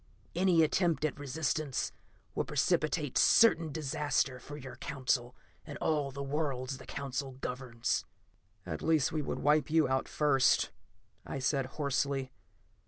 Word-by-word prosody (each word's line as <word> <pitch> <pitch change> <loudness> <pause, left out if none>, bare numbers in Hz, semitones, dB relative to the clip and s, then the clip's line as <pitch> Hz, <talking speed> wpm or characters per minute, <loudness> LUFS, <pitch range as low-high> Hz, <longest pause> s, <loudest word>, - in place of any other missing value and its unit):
Any 175 -2 +4
attempt 165 0 +2
at 150 - -2
resistance 145 0 -1 0.4
will - - 0
precipitate 150 -3 +1
certain 165 -8 +5
disaster 145 -3 0
for 145 +4 -9
your 130 -3 -9
Council 130 -3 -1 0.3
and - - -8
all 150 -3 0
the 140 +1 -5
worlds 135 -2 -2
the - - -12
Council 135 -1 -4
governs." 125 -2 -2 0.6
"At 80 - -4
least, 160 -4 +2
we 155 - -1
would - - -3
wipe 150 -1 +3
you 160 0 +4
out 130 0 0
first," 145 -4 +3 0.5
I - - -5
said 135 0 0
hoarsely. 140 -2 0
140 Hz, 135 wpm, -32 LUFS, 130-155 Hz, 0.6 s, certain